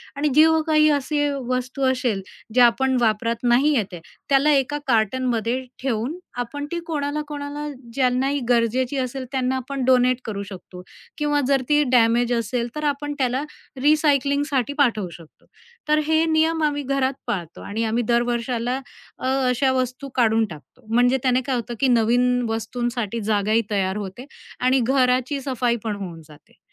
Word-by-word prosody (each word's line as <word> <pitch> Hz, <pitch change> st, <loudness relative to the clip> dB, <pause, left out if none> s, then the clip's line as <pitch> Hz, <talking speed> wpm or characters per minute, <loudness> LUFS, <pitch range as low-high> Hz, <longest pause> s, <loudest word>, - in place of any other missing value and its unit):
आणि 290 Hz, +1 st, 0 dB
जी 310 Hz, +1 st, +8 dB, 0.2 s
काही 305 Hz, 0 st, +4 dB
असे 290 Hz, +1 st, 0 dB, 0.2 s
वस्तू 255 Hz, +2 st, -2 dB
असेल, 245 Hz, -6 st, -1 dB, 0.3 s
जे 250 Hz, -, +6 dB
आपण 260 Hz, +2 st, +4 dB
वापरात 230 Hz, +1 st, 0 dB
नाही 260 Hz, +5 st, +3 dB
येते, 195 Hz, -7 st, -2 dB, 0.3 s
त्याला 275 Hz, +2 st, +4 dB
एका 280 Hz, +1 st, +1 dB
कार्टनमध्ये 240 Hz, +1 st, 0 dB, 0.2 s
ठेऊन 255 Hz, +5 st, -2 dB, 0.2 s
आपण 290 Hz, +5 st, -5 dB
ती 340 Hz, -, -2 dB
कोणाला-कोणाला 295 Hz, -1 st, -4 dB, 0.3 s
ज्यांनाही 265 Hz, +2 st, +1 dB
गरजेची 245 Hz, +3 st, +1 dB
असेल, 260 Hz, 0 st, -3 dB
त्यांना 260 Hz, -1 st, 0 dB
आपण 260 Hz, +1 st, -4 dB
डोनेट 255 Hz, -1 st, +4 dB
करू 200 Hz, -2 st, -4 dB
शकतो 185 Hz, -1 st, -10 dB, 0.4 s
किंवा 295 Hz, -1 st, +1 dB
जर 275 Hz, -2 st, +3 dB
ती 295 Hz, 0 st, +4 dB
डॅमेज 240 Hz, 0 st, +3 dB
असेल, 235 Hz, +1 st, -1 dB
तर 300 Hz, -, -4 dB
आपण 290 Hz, 0 st, -1 dB
त्याला 260 Hz, +2 st, 0 dB, 0.4 s
रिसायकलिंगसाठी 285 Hz, -3 st, +2 dB
पाठवू 220 Hz, -, +2 dB
शकतो. 165 Hz, -2 st, -15 dB, 0.4 s
तर 305 Hz, 0 st, +3 dB
हे 320 Hz, +1 st, +3 dB
नियम 320 Hz, 0 st, +2 dB
आम्ही 290 Hz, -1 st, 0 dB
घरात 270 Hz, 0 st, 0 dB
पाळतो 170 Hz, -4 st, -4 dB
आणि 220 Hz, +3 st, -3 dB
आम्ही 225 Hz, +2 st, 0 dB
दर 235 Hz, 0 st, +3 dB
वर्षाला 240 Hz, +2 st, -2 dB, 0.4 s
अ, -, -, -3 dB, 0.2 s
अशा 260 Hz, +2 st, +2 dB
वस्तू 255 Hz, +2 st, -2 dB
काढून 225 Hz, -2 st, +3 dB
टाकतो, 170 Hz, -, -14 dB
म्हणजे 245 Hz, +3 st, +3 dB
त्याने 255 Hz, 0 st, +2 dB
काय 265 Hz, -2 st, 0 dB
होतं, 240 Hz, 0 st, -4 dB
की 270 Hz, -, +3 dB
नवीन 245 Hz, +1 st, +3 dB
वस्तूंसाठी 230 Hz, 0 st, -3 dB
जागाही 215 Hz, +1 st, +1 dB
तयार 195 Hz, 0 st, 0 dB
होते 205 Hz, +5 st, -7 dB, 0.3 s
आणि 255 Hz, +1 st, +3 dB
घराची 260 Hz, +1 st, +1 dB
सफाई 250 Hz, -3 st, 0 dB
पण 215 Hz, -2 st, -2 dB
होऊन 175 Hz, -5 st, -7 dB
जाते. 150 Hz, -1 st, -19 dB
255 Hz, 155 wpm, -22 LUFS, 230-280 Hz, 0.4 s, जी